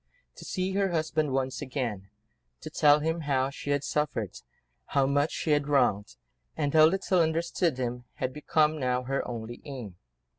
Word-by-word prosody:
To - - -10
see 185 0 -2
her 195 0 +1
husband 155 -3 0
once 130 0 -1
again, 120 -8 -4 0.5
to - - -8
tell 150 0 +5
him 160 +2 -1
how 135 -3 0
she 145 - -7
had 145 0 +1
suffered, 145 - -2 0.5
how 140 -1 +2
much 145 +2 +2
she 160 - -2
had 145 -1 +2
wronged, 105 - +2 0.4
and 145 -1 0
how 155 -1 +8
little 185 +1 +2
understood 165 -1 0
him, 125 -1 -3
had 130 0 -3
become 155 +1 +1
now 125 -1 0
her 135 +2 -1
only 120 0 -6
aim. 120 -10 -8
145 Hz, 170 wpm, -28 LUFS, 125-155 Hz, 0.5 s, how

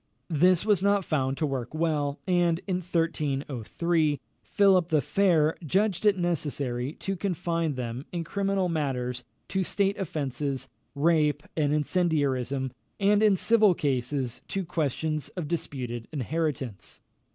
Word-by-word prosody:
This 180 +4 +4
was 205 -4 +3
not 200 -1 +2
found 135 -3 0
to 155 - 0
work 135 -1 -3
well, 150 -3 0
and, 175 -2 +2
in 185 -3 0
1303, 155 -2 0 0.2
Philip 190 -4 +3
the 160 -3 +3
Fair 160 0 +2
judged 195 +5 +1
it 200 -2 +4
necessary 145 -7 -1
to 195 +3 -4
confine 170 -5 -1
them, 125 +2 -5
in 170 -2 -2
criminal 195 +2 0
matters, 125 -6 -2 0.3
to 190 - 0
state 200 +2 0
offences, 140 -6 -2 0.3
rape, 150 -1 +2
and 150 -3 +1
incendiarism; 140 -5 0 0.3
and 205 +1 +4
in 210 -2 +5
civil 215 -1 +4
cases, 130 -4 -1
to 195 -2 -2
questions 155 -1 -2
of 170 -4 -3
disputed 125 -8 -4
inheritance. 140 -6 -3
155 Hz, 130 wpm, -27 LUFS, 140-180 Hz, 0.3 s, in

